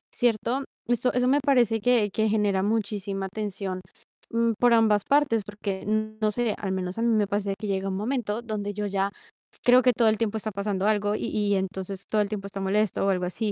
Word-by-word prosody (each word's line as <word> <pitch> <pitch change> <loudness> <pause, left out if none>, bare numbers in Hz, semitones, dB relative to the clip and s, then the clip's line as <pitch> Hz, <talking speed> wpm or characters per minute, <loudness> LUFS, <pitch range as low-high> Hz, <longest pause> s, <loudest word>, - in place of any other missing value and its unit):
¿Cierto? 240 +3 +1 0.2
Eso 240 +1 +1
eso 250 0 +2
me 280 +3 +4
parece 240 -6 +3
que 230 -2 +3
que 220 0 +1
genera 205 -3 +1
muchísima 200 -2 -2
tensión, 195 -2 -4 0.5
mm, 230 0 +2
por 245 -1 +5
ambas 215 -3 +4
partes, 280 -6 +3
porque 205 -2 -5
no 215 0 0
sé, 235 -1 0
al 195 - -3
menos 185 0 -3
a - - -1
mí 235 - +2
me 215 -3 +2
pasa 205 0 -1
de 195 - -1
que 215 - -4
llega 195 0 -1
un 190 - -2
momento 225 0 -2
donde 210 -3 -4
yo 210 +1 -3
ya 195 0 0 0.5
creo 250 +1 +6
que 250 - +5
todo 230 0 +3
el 215 - +1
tiempo 220 -1 -1
está 215 0 -4
pasando 200 -1 -2
algo, 205 -1 +1
y - - -3
y 205 -1 0
entonces 190 0 -4
todo 215 - +1
el 205 - 0
tiempo 200 -2 -4
está 200 0 -7
molesto 200 +1 +1
o - - +2
algo 180 -2 +1
así. 205 +4 -2
210 Hz, 220 wpm, -26 LUFS, 200-225 Hz, 0.5 s, creo